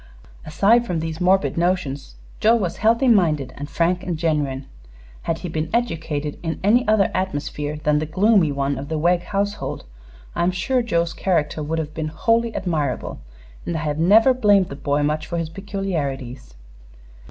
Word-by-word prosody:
Aside 225 Hz, +10 st, +3 dB
from 175 Hz, -4 st, -1 dB
these 160 Hz, +1 st, -5 dB
morbid 185 Hz, -1 st, +2 dB
notions, 150 Hz, -, -1 dB, 0.2 s
Joe 225 Hz, +2 st, +5 dB
was 185 Hz, -5 st, -2 dB
healthy 230 Hz, +6 st, +3 dB
minded 155 Hz, -, +2 dB
and 145 Hz, +1 st, -7 dB
frank 175 Hz, +4 st, +1 dB
and 180 Hz, -3 st, -3 dB
genuine. 145 Hz, -5 st, -1 dB, 0.6 s
Had 165 Hz, -, -2 dB
he -, -, -1 dB
been 160 Hz, -1 st, -3 dB
educated 160 Hz, -10 st, -2 dB
in 165 Hz, -1 st, -3 dB
any 230 Hz, +5 st, +3 dB
other 215 Hz, -2 st, +3 dB
atmosphere 150 Hz, -5 st, -3 dB
than 150 Hz, 0 st, +1 dB
the 155 Hz, -, -3 dB
gloomy 190 Hz, -1 st, +3 dB
one 140 Hz, -1 st, -1 dB
of 140 Hz, +2 st, -7 dB
the 160 Hz, -, -1 dB
Wegg 175 Hz, +3 st, +2 dB
household 205 Hz, +1 st, -3 dB, 0.5 s
I -, -, -2 dB
am 175 Hz, -, +3 dB
sure 190 Hz, +8 st, 0 dB
Joe's 170 Hz, -7 st, 0 dB
character 160 Hz, -4 st, 0 dB
would 155 Hz, +2 st, -2 dB
have 155 Hz, -1 st, -4 dB
been 155 Hz, -1 st, -3 dB
wholly 230 Hz, +9 st, +1 dB
admirable, 165 Hz, -6 st, -2 dB, 0.4 s
and 170 Hz, -, -3 dB
I -, -, -3 dB
have 150 Hz, -1 st, -2 dB
never 220 Hz, +9 st, +6 dB
blamed 205 Hz, -6 st, +3 dB
the 140 Hz, -, -6 dB
boy 145 Hz, +1 st, 0 dB
much 150 Hz, +1 st, -1 dB
for 170 Hz, -, -3 dB
his 165 Hz, -2 st, -2 dB
peculiarities. 150 Hz, -, -4 dB
165 Hz, 175 wpm, -22 LUFS, 150-195 Hz, 0.6 s, never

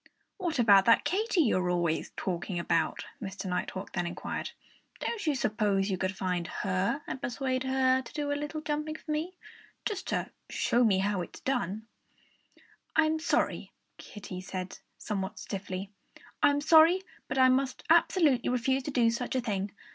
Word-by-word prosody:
"What 345 Hz, -6 st, -2 dB
about 200 Hz, -5 st, +6 dB
that 230 Hz, -, +5 dB
Katy 385 Hz, +4 st, +2 dB
you're 185 Hz, -, +2 dB
always 175 Hz, -2 st, 0 dB
talking 180 Hz, 0 st, -3 dB
about?" 165 Hz, -1 st, 0 dB, 0.2 s
Mr. 195 Hz, -1 st, -6 dB
Nighthawk 185 Hz, +1 st, -3 dB
then 175 Hz, -1 st, -1 dB
inquired. 175 Hz, -, -4 dB, 0.5 s
"Don't 425 Hz, -7 st, -3 dB
you 300 Hz, -, +3 dB
suppose 210 Hz, -4 st, +1 dB
you 185 Hz, -, 0 dB
could 190 Hz, 0 st, -2 dB
find 180 Hz, -2 st, -1 dB
her 195 Hz, -, -1 dB
and 265 Hz, -, -5 dB
persuade 255 Hz, 0 st, -1 dB
her 260 Hz, 0 st, +3 dB
to 255 Hz, -, -12 dB
do 290 Hz, -2 st, -2 dB
a -, -, +2 dB
little 295 Hz, +2 st, -4 dB
jumping 300 Hz, +1 st, -2 dB
for 315 Hz, -, -7 dB
me 320 Hz, +5 st, -2 dB, 0.5 s
just 405 Hz, -3 st, -3 dB
to -, -, -2 dB, 0.2 s
show 240 Hz, +1 st, +2 dB
me 205 Hz, -5 st, +4 dB
how 195 Hz, 0 st, 0 dB
it's 175 Hz, -, -9 dB
done?" 220 Hz, -5 st, -2 dB, 1.1 s
"I'm 315 Hz, 0 st, +3 dB
sorry 315 Hz, -, 0 dB
" -, -, -48 dB
Kiddie 195 Hz, -3 st, -8 dB
said 185 Hz, 0 st, -5 dB, 0.2 s
somewhat 195 Hz, -2 st, -4 dB
stiffly, 190 Hz, 0 st, -5 dB, 0.5 s
"I'm 285 Hz, 0 st, +4 dB
sorry; 325 Hz, +4 st, +6 dB, 0.2 s
but 265 Hz, -, -3 dB
I 260 Hz, 0 st, +6 dB
must 260 Hz, 0 st, +1 dB
absolutely 320 Hz, -6 st, +4 dB
refuse 250 Hz, +2 st, +1 dB
to -, -, -2 dB
do 235 Hz, -4 st, +3 dB
such 245 Hz, +3 st, -3 dB
a -, -, +3 dB
thing. 205 Hz, -4 st, -2 dB
240 Hz, 165 wpm, -30 LUFS, 190-295 Hz, 1.1 s, about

